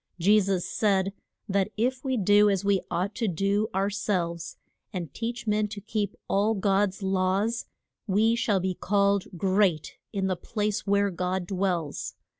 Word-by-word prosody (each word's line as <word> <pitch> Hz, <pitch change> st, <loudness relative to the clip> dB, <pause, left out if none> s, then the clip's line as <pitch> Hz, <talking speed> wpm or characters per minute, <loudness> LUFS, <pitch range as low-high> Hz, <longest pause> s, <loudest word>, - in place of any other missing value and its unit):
Je 200 Hz, +5 st, +5 dB
sus 190 Hz, -3 st, 0 dB
said 195 Hz, -2 st, +1 dB, 0.3 s
that 195 Hz, 0 st, +1 dB
if 250 Hz, +3 st, 0 dB
we 260 Hz, -2 st, 0 dB
do 205 Hz, +1 st, +5 dB
as 195 Hz, -1 st, 0 dB
we 200 Hz, -2 st, +3 dB
ought 190 Hz, +4 st, -1 dB
to 230 Hz, -1 st, -1 dB
do 200 Hz, +4 st, +1 dB
our 195 Hz, +2 st, 0 dB
selves, 175 Hz, -5 st, -2 dB, 0.3 s
and 175 Hz, -8 st, -5 dB
teach 235 Hz, +1 st, -4 dB
men 210 Hz, 0 st, +1 dB
to 205 Hz, 0 st, -7 dB
keep 205 Hz, -1 st, -3 dB
all 210 Hz, +3 st, +2 dB
God's 195 Hz, 0 st, +1 dB
laws, 190 Hz, +4 st, 0 dB, 0.4 s
we 215 Hz, +3 st, +3 dB
shall 210 Hz, -4 st, +1 dB
be 185 Hz, 0 st, -1 dB
called 200 Hz, +1 st, +1 dB
great 190 Hz, -3 st, +1 dB
in 195 Hz, -3 st, -1 dB
the 190 Hz, -1 st, 0 dB
place 210 Hz, +2 st, -2 dB
where 200 Hz, 0 st, +2 dB
God 180 Hz, +1 st, -2 dB
dwells. 180 Hz, -5 st, -2 dB
200 Hz, 160 wpm, -27 LUFS, 185-210 Hz, 0.4 s, Je